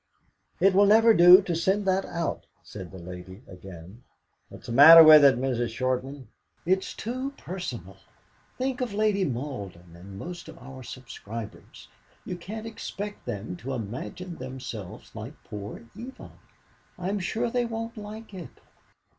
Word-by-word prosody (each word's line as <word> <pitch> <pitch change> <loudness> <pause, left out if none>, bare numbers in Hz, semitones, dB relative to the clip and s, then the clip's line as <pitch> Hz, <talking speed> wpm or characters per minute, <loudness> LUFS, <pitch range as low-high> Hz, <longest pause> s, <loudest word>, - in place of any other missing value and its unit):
"It 195 0 +4
will 200 +2 +5
never 225 +2 +6
do 180 +1 +8
to 175 -3 -2
send 190 +5 0
that 190 0 +1
out," 170 -1 -4 0.2
said 95 -4 -9
the 95 - -11
lady 90 +4 -10
again. 90 +3 -12 0.5
"What - - -12
is - - -17
the 120 - -6
matter 160 +6 +10
with 155 -1 +9
it, 135 -4 +6
Mrs. 125 -2 -1
Shortman?" 130 +3 -3 0.4
"It's 190 +2 0
too 255 +5 -5
personal. 120 - -7 0.6
Think 260 0 -2
of 235 -5 -3
Lady 210 -2 +1
Malden, 100 - -6
or 85 - -14
most 100 - -9
of - - -12
our 130 +1 -11
subscribers. 115 -3 -9 0.4
You 180 - -4
can't 210 +6 -8
expect 210 -2 -7
them 100 -2 -5
to 135 +7 -6
imagine 130 - -6
themselves 125 -6 -8
like 110 +7 -8
poor 105 +1 -8
Eva. 245 +5 -10 0.7
I'm 190 +3 -2
sure 230 +6 -2
they 245 0 0
won't 230 0 -5
like 215 0 -9
it." 180 -4 -10
150 Hz, 150 wpm, -26 LUFS, -, 0.7 s, matter